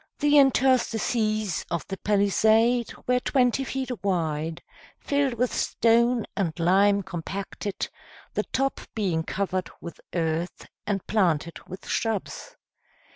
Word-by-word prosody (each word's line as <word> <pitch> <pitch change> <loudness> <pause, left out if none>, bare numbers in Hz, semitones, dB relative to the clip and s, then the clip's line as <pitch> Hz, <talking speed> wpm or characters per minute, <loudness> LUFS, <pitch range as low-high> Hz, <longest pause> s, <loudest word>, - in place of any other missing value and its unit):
The 295 0 +5
interstices 230 - +2
of 170 - -2
the 195 - -5
palisade 220 +4 +3
were 250 0 +2
twenty 250 0 +2
feet 265 0 -3
wide, 165 -4 -1 0.4
filled 280 -3 0
with 250 +1 0
stone 235 0 +2
and 175 -5 -2
lime 200 +4 +4
compacted, 190 +2 -5 0.5
the - - +1
top 270 +1 0
being 185 -7 0
covered 185 +1 -2
with 170 - -9
earth, 165 +1 -2 0.2
and 195 -3 -1
planted 170 -6 +1
with 185 +1 -9
shrubs. 225 - -3
205 Hz, 115 wpm, -26 LUFS, 180-245 Hz, 0.5 s, The